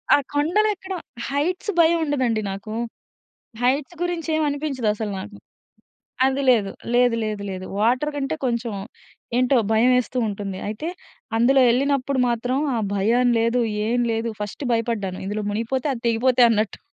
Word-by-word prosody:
ఆ! - - +4 0.2
కొండలెక్కడం 380 +5 0 0.3
హైట్స్ 345 +9 -1
భయం 335 +1 +5
ఉండదండి 255 -7 0
నాకు. 200 +3 -6 0.9
హైట్స్ 275 +6 +1
గురించేం 330 -3 -1
అనిపించదసలు 250 -8 -2
నాకు. 205 +2 -8 0.9
అది 270 +1 0
లేదు. 210 -6 +4 0.2
లేదు. 245 -1 +4
లేదు. 210 -2 -3
లేదు. 185 0 -5 0.2
వాటర్ 255 +7 +2
కంటే 275 +2 -2
కొంచెం 235 -2 -1 0.7
ఏంటో 255 +1 +3 0.2
భయం 230 +3 +4
ఏస్తూ 250 +1 -2
ఉంటుంది. 200 -2 -5
అయితే, 220 +10 -4 0.5
అందులో 265 +4 +4
ఎళ్ళినప్పుడు 275 +1 +1
మాత్రం 240 +2 -1 0.2
ఆ - - 0 0.2
భయం 235 +5 +3
లేదు, 230 +2 +2 0.3
ఏం 245 +1 +1
లేదు. 225 +1 -1
ఫస్ట్ 210 +7 -5
భయపడ్డాను. 225 -5 -1
ఇందులో 210 +1 -2
మునిగిపోతే, 230 +6 -2
అది 235 - -6
తెగిపోతే 245 +2 +3
అన్నట్టు. 215 -1 0
245 Hz, 135 wpm, -23 LUFS, 220-280 Hz, 0.9 s, భయం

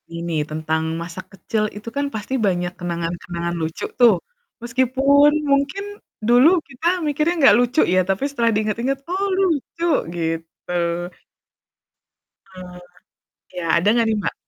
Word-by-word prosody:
ini, 170 0 -3
tentang 160 +1 -2 0.2
masa 170 +2 -7
kecil 215 +2 -2
itu 210 +2 -7
kan 285 - 0
pasti 215 +5 -5
banyak 175 -1 -1
kenangan-kenangan 170 0 -4
lucu, 160 0 -3
tuh. 235 -5 +7 0.5
Meskipun 265 +4 +3 0.2
mungkin 280 +8 +1 0.4
dulu 245 +6 +6 0.2
kita 280 +5 -4 0.2
mikirnya 300 +3 +1 0.2
gak - - +5
lucu, 245 +4 +2
ya. 185 +1 +3
Tapi 195 +5 -1
setelah 235 -4 +1
di - - +2
inget-inget, 240 +6 -1
"Oh 385 +3 -1 0.2
lucu," 335 0 -1 0.3
gitu. 165 0 -4 1.8
Mmm, 180 -1 -10 0.8
ya, 180 - -3
ada 170 +4 +2
nggak 230 -1 +2
nih, 220 - +1
Mbak? - - -3
215 Hz, 135 wpm, -21 LUFS, 175-275 Hz, 1.8 s, tuh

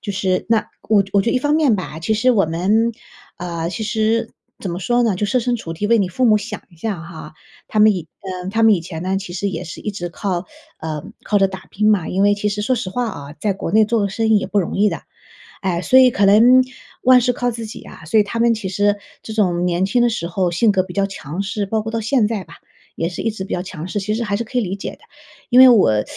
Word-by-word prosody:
就 205 - -5
是， 190 -1 -1
那 225 -2 +1 0.2
我 210 -2 +5
觉 195 - -14
我 200 - +4
觉 230 - 0
一 255 - +2
方 290 +3 +1
面 285 -9 +3
吧， 160 -4 -6
其 220 +7 -1
实 250 +4 +3
我 195 -8 +3
们 205 +8 +1 0.4
呃， 170 -1 -4
其 220 +4 -4
实 220 +1 0 0.3
怎 190 - -5
么 175 - -4
说 240 +6 +1
呢？ 215 -6 +1
就 210 - -1
设 255 - +1
身 245 0 0
处 165 -6 -7
地 205 +6 -2
为 230 +1 +4
你 190 -3 +1
父 255 +8 -1
母 215 -2 +5
想 210 +3 -7
一 170 - -20
下 200 +1 -3
哈， 160 -2 -10 0.3
他 215 - -2
们 215 0 +6
以 170 -4 -5 0.4
嗯， - - -4
他 225 +3 0
们 220 -1 +6
以 180 - +2
前 165 -1 -7
呢 190 +1 -1
其 180 -3 -8
实 200 +2 -2
也 180 0 -5
是 170 - -9
一 210 - -2
直 175 -3 -5
靠 180 0 -3 0.3
呃， 155 -2 -5 0.2
靠 210 - +1
着 195 -1 +4
打 190 0 -9
拼 215 +2 +2
嘛， 190 -6 +1
因 190 +2 0
为 205 0 +5
其 210 0 -2
实 210 0 -3
说 255 +4 +1
实 220 -5 -3
话 245 +5 -2
啊， 145 -7 -8
在 205 -2 0
国 190 - -5
内 220 +1 +5
做 230 +1 0
个 200 - 0
生 220 +3 -1
意 215 - +5
也 - - -4
不 205 - 0
容 190 - -2
易 210 +1 +4
的。 - - -5 0.6
哎， 180 -2 -1
所 260 - +4
以 255 -1 +6
可 200 - +2
能 235 +6 +6 0.4
万 255 0 +7
事 250 +1 +2
靠 245 0 -1
自 230 -1 -5
己 215 - -9
啊， - - -13
所 215 +7 +3
以 - - +5
他 205 +3 -5
们 235 0 +4
其 215 -3 -4
实 205 +2 +1 0.2
这 220 - -8
种 180 -5 +1
年 180 +1 +1
轻 240 +5 +1
的 240 - +4
时 195 -7 -3
候 175 0 -1
性 210 +5 +3
格 185 -1 +2
比 180 -2 -10
较 200 -1 +1
强 175 -2 -6
势， 200 +1 -2
包 220 +2 -1
括 220 - -5
到 225 0 -2
现 225 -1 +2
在 210 -4 -3
吧 165 - -15 0.4
也 165 - -1
是 175 - -6
一 225 - 0
直 195 -3 -6
比 - - -5
较 180 - -1
强 180 -2 -7
势， 205 - -3
其 210 +2 -2
实 235 +2 -1
还 200 -1 -1
是 235 - -2
可 250 +3 -5
以 - - +1
理 190 -2 -3
解 200 - -6
的。 - - -15 0.5
因 250 +1 +5
为 260 - +10
我 110 - +4
205 Hz, 305 characters per minute, -19 LUFS, 180-225 Hz, 0.6 s, 为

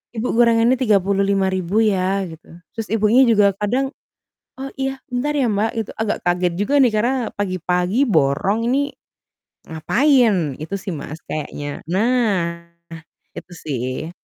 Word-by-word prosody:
"Ibu, 225 +3 -2
gorengannya 235 +1 +4
Rp35.000, 195 -3 +1
ya," 195 -1 +1
gitu. 160 -1 -13 0.3
Terus, 225 -2 -4
ibunya 225 +4 +4
juga 205 -3 +4
kadang, 250 +7 -1 0.7
"Oh, 270 0 -5
iya. 270 0 -2
Bentar, 275 +4 -1
ya, 260 - +2
Mbak," 210 +2 0
gitu, - - -11
agak 220 -1 -1
kaget 175 0 +1
juga, 240 +8 0
nih, 245 - +4
karena 240 +5 +1 0.2
pagi-pagi 185 - 0
borong 195 - +1
ini, 285 +2 +1 0.8
ngapain. 205 - +2
Itu 180 +5 -5
sih, 190 - -6
Mas, 150 +2 -7
kayaknya. 145 -1 -5
Nah, 190 -6 0 0.7
itu - - -11
sih, 130 +1 -4
205 Hz, 130 wpm, -20 LUFS, 180-240 Hz, 0.8 s, gorengannya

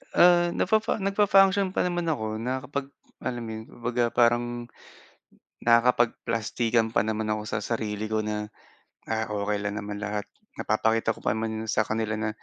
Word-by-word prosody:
Ah, 175 0 +6
nafafa 220 +4 +2
nag-function 195 -1 +4
pa - - +2
naman 175 -1 -2
ako, 110 -6 -2
nakakapag 130 +3 -3 0.4
alam 120 -2 -3
mo - - -6
yun, 110 - -7
kumbaga 120 0 -2
parang 120 0 +3 1.2
nakakapagplastikan 115 -1 +2
pa - - +4
naman 110 0 -1
ako 105 0 -1
sa - - -2
sarili 110 -2 -2
ko 110 - +1
na, 105 0 -3 0.6
"Ah, 110 0 -1
okey 105 0 -1
lang 105 0 -2
naman 105 0 -5
lahat 105 -1 -3 0.3
napapakita 110 +1 +1
ko - - -14
pa - - +2
naman 110 0 -3
sa 110 0 +2
kanila 110 0 -1
na 110 0 -1
115 Hz, 155 wpm, -26 LUFS, 110-130 Hz, 1.2 s, Ah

